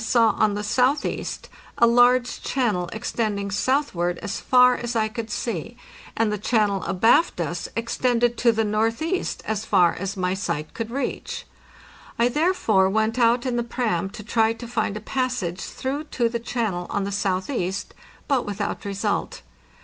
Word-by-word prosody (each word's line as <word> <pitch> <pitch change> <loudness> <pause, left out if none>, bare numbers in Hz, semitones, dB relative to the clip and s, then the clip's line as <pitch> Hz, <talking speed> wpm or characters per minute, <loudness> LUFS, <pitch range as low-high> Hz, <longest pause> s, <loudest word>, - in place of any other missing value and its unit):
From 225 - -4
the - - 0
crow's 235 - +6
nest - - +6
I - - +4
saw - - -1
on 210 -1 +3
the 210 - -3
southeast 255 +7 0 0.3
a 235 - +6
large 245 +1 +4
channel 210 -10 0
extending 210 -2 -2
southward 195 -7 0
as 205 - -4
far 250 -1 +5
as 240 0 -4
I 220 -1 +2
could 225 0 -5
see, 230 +1 -4 0.4
and 225 -1 +2
the 210 - -2
channel 205 -3 +1
abaft 225 - +3
us 170 +1 -3
ex 230 0 -2
tended 240 -1 +2
to 235 - +4
the 225 0 0
northeast 225 - -1
as 215 -1 -2
far 175 -5 +4
as 195 +2 -4
my 180 0 0
sight 170 -5 -3
could 230 -1 -4
reach. 275 +4 -4 0.7
I 235 +1 +3
therefore 245 - +2
went 220 +4 0
out 240 +2 +3
in 250 -2 0
the 240 - +1
"pram" 220 -6 -1
to 210 - -9
try 225 +1 +2
to 235 +1 -9
find 220 -3 -1
a - - -7
passage 235 -8 -2
through 280 +4 -4
to 240 -5 0
the 235 0 -3
channel 225 -7 -2
on 200 - -1
the 200 - -3
southeast, 190 0 -2 0.3
but 270 -4 +2
without 205 +1 -4
result. 200 +1 -2
225 Hz, 180 wpm, -24 LUFS, 200-245 Hz, 0.7 s, crow's